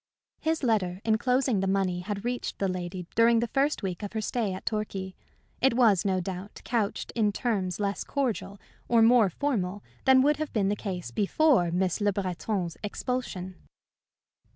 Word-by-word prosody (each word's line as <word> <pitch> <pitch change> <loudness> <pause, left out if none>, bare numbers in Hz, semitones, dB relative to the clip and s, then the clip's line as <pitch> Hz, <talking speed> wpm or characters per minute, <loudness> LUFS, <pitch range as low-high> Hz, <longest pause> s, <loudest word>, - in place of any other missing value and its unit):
His 320 -1 -1
letter 190 -7 +1
enclosing 245 +1 +2
the 195 - 0
money 190 -2 +1
had 200 +3 -5
reached 245 0 -3
that 195 -2 0
lady 180 0 -5
during 230 0 +5
the 235 0 -1
first 280 -2 +1
week 185 -3 -3
of 205 0 -6
her 220 - -1
stay 215 -1 -1
at 185 - -7
Torquay. 195 -3 -3 0.5
It 260 -2 +4
was, 220 -8 +4
no 190 -2 +2
doubt, 185 +2 -6
couched 225 -4 -1
in 215 -3 +2
terms 195 -5 -1
less 200 -1 -1
cordial 240 -7 -2 0.3
or 230 -2 +5
more 230 -3 +6
formal 205 - -2 0.2
than 260 -1 +6
would 295 +1 +3
have 310 -1 -3
been 200 -3 +2
the 205 - +1
case 180 - -5
before 210 - +3
Miss 180 +2 0
Le 205 0 +3
Breton's 185 -2 -3
expulsion. 210 -4 -3
205 Hz, 170 wpm, -28 LUFS, 185-240 Hz, 0.5 s, more